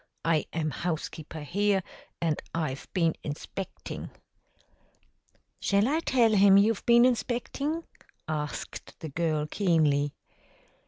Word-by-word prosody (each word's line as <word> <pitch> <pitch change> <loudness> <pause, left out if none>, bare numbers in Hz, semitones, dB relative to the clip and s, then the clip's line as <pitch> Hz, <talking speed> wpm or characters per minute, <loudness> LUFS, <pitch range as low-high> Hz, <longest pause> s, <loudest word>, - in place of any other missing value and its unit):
I 165 -2 +2
am 155 -1 -1
housekeeper 160 -1 -4
here, 195 +5 +1 0.4
and 160 -3 0
I've 150 -5 -2
been 165 -4 +2
inspecting." 155 +5 -6 1.5
"Shall 200 +2 +2
I 305 +4 +2
tell 245 -8 +3
him 195 -1 +7
you've 210 +1 +3
been 235 0 +7
inspectin'?" 255 +6 -1 0.4
asked 150 -2 -5
the 160 - -5
girl 155 0 0
keenly. 150 -5 +2
170 Hz, 105 wpm, -28 LUFS, 155-210 Hz, 1.5 s, him